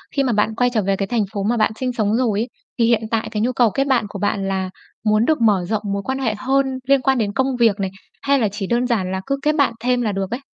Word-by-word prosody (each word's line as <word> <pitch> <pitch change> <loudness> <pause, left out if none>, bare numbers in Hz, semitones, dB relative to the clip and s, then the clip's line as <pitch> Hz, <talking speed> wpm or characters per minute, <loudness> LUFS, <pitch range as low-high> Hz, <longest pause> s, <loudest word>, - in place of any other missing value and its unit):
khi 275 - +2
mà 245 -3 +1
bạn 210 +1 +1
quay 245 +1 +2
trở 215 - +2
về 195 0 0
cái 195 0 -2
thành 230 -2 +1
phố 200 -1 -2
mà 235 +3 +1
bạn 220 - +2
sinh 255 -1 -1
sống 215 -1 +1
rồi 230 -5 +1
ấy, 235 - -1 0.3
thì 230 - +4
hiện 230 -1 +3
tại 225 -1 0
cái 210 - -2
nhu 250 +3 +1
cầu 235 -3 +4
kết 275 0 0
bạn 245 -5 +2
của 200 - -7
bạn 205 -1 -1
là 190 -1 -1 0.4
muốn 215 +2 +3
được 310 -6 +1
mở 200 -5 +3
rộng 215 -2 0
mối 200 - -2
quan 265 +1 -2
hệ 225 -5 0
hơn 270 +3 +1 0.2
liên 275 -1 +4
quan 265 -1 +2
đến 205 -3 -1
công 265 0 0
việc 220 -3 +3
này, 190 -1 -2 0.3
hay 280 0 +2
là 220 - +2
chỉ 200 -2 -4
đơn 240 +1 +1
giản 190 -6 0
là 190 0 -2
cứ 275 0 0
kết 300 0 +2
bạn 280 -5 +2
thêm 250 0 +1
là 215 -3 0
được 195 +1 -3
ấy? 240 - -2
225 Hz, 300 wpm, -20 LUFS, 205-255 Hz, 0.4 s, thì